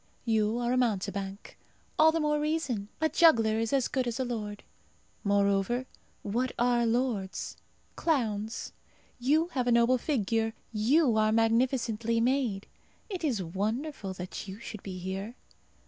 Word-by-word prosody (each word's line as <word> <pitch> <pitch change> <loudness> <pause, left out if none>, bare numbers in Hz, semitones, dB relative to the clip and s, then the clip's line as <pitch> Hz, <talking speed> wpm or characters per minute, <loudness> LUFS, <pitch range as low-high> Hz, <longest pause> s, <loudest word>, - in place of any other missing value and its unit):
You 220 -1 +2
are 240 0 0
a - - +2
mountebank. 200 -4 -2 0.4
All 315 +1 +7
the 325 - 0
more 300 -1 +1
reason. 295 -9 -1
A 315 - +3
juggler 225 -11 +4
is 225 -1 -1
as 270 -3 +2
good 260 -2 -1
as 240 +2 -3
a 260 - 0
lord. 210 -4 -4 0.6
Moreover, 200 +4 +2 0.4
what 245 +5 -1
are 240 -1 +2
lords? 225 -5 -1 0.4
Clowns. 225 -8 -1 0.5
You 305 +7 +2
have 255 -7 -1
a - - +3
noble 235 +2 +4
figure; 225 -4 0 0.2
you 235 +3 +3
are 215 0 +3
magnificently 230 0 +1
made. 240 -5 +1 0.5
It 365 -3 -4
is 240 -11 0
wonderful 205 - -3
that 180 +3 -6
you 195 +2 -8
should 215 -3 -8
be 190 -2 -6
here. 190 +5 -5
230 Hz, 145 wpm, -29 LUFS, 210-255 Hz, 0.6 s, All